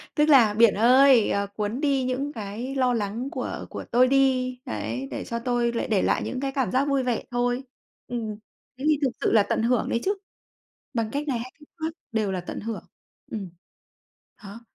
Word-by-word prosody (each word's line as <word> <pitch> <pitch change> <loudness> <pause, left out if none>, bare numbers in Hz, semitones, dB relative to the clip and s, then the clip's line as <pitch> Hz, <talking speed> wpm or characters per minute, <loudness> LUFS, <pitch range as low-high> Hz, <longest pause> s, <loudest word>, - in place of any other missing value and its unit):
tức 300 0 +3
là 235 -7 +6
"Biển 225 -1 +5
ơi, 250 +1 +6
ờ, 200 0 0
cuốn 210 +6 -3
đi 275 -3 +2
những 270 +3 -2
cái 225 +6 -5
lo 255 -2 +2
lắng 225 +4 -2
của - - -4
của - - -7
tôi 250 +2 +5
đi", 255 -2 +2
đấy, 110 +5 -4
"Để - - -4
cho 235 0 -3
tôi 240 -1 0
lại 230 - -2
để 205 -4 +2
lại - - +1
những 255 - -3
cái 270 0 -2
cảm 265 -2 -1
giác 270 +3 +2
vui 275 -2 +1
vẻ 245 -3 -1
thôi." 245 +2 0 0.4
Ừm, 225 -3 -4 0.4
thế 275 - -5
thì 295 -2 +3
thực 260 - +2
sự - - +2
là 210 -3 +6
tận 225 - -1
hưởng 240 -1 +1
đấy 235 - 0
chứ. 400 +1 +1 0.8
Bằng 225 -2 -1
cách 290 +3 -3
này 245 -4 0
hay 250 +2 -7
cách 295 - -17
khác 320 0 -2 0.2
đều 215 -3 0
là 185 - -2
tận 175 - -6
hưởng. 225 0 -5 0.5
Ừm, 200 -5 -4 1.0
đó, 205 +4 -9
245 Hz, 210 wpm, -25 LUFS, 215-270 Hz, 1.0 s, là